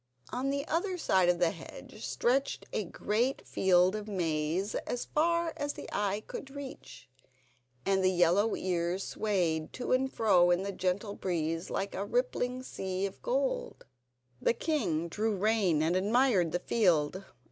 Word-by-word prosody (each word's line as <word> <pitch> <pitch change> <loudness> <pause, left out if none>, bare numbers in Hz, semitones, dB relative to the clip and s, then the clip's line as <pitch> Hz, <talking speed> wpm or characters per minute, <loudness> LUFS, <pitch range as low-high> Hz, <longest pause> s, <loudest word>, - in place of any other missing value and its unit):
On 260 +2 -1
the 280 +1 -2
other 360 +3 0
side 190 - +3
of 175 - +3
the 170 -1 +2
hedge - - -11
stretched 270 +3 0
a 215 - -1
great 230 +9 -1
field 185 0 +3
of 210 0 -5
maize 170 0 -1
as 245 - -3
far 335 +1 +1
as 290 0 -2
the - - -8
eye 205 +1 -1
could 270 - -7
reach, 275 - -9 0.8
and 195 -1 +2
the 185 - +5
yellow 180 +4 +3
ears 180 +1 -1
swayed 175 -7 -1
to 250 - -4
and 265 +1 +2
fro 185 -6 +4
in 175 +2 +2
the 200 - -2
gentle 195 +2 -1
breeze 165 -3 -2
like 195 +1 -2
a 195 - -2
rippling 250 +3 -1
sea 190 -5 -3
of 195 - -7
gold. - - -1 0.6
The - - +3
king 170 - 0
drew 215 +5 -1
rein 195 -6 +2
and 165 +3 +1
admired 205 -3 +3
the 175 - +1
field. 180 -3 +1
200 Hz, 160 wpm, -31 LUFS, 180-250 Hz, 0.8 s, the